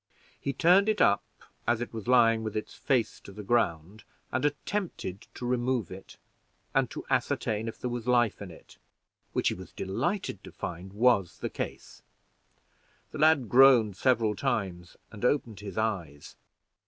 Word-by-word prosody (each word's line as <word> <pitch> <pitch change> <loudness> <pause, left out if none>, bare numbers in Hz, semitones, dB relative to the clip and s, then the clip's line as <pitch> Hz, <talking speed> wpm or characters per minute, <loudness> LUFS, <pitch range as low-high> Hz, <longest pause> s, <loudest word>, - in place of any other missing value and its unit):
He 140 - -2
turned 180 +8 +4
it 215 - +1
up 100 0 +4 0.4
as 120 -1 +2
it 120 - -5
was 110 -1 -7
lying 115 -3 +5
with 110 -1 -3
its 105 - -5
face 125 -6 0
to - - -12
the 105 +2 -9
ground, 100 -3 0 0.3
and 130 - -1
attempted 145 - -3
to 125 - -6
remove 125 -3 0
it, 95 +1 -11 0.6
and - - +2
to - - -7
ascertain 110 +1 0
if 115 - -6
there 125 - -3
was 120 -1 -5
life 120 -4 +2
in 100 - -7
it, 80 - -15 0.6
which - - +2
he - - -2
was - - -10
delighted 175 - -2
to - - -10
find 90 +2 -6
was 105 -5 +2
the - - -4
case. - - -6 1.1
The - - -7
lad 155 -5 +4
groaned 120 -5 +6
several 115 -2 +2
times, 90 -4 -3
and 105 +1 -10
opened 125 -5 0
his 100 -2 -8
eyes. 90 -10 -3
115 Hz, 165 wpm, -28 LUFS, 100-125 Hz, 1.1 s, groaned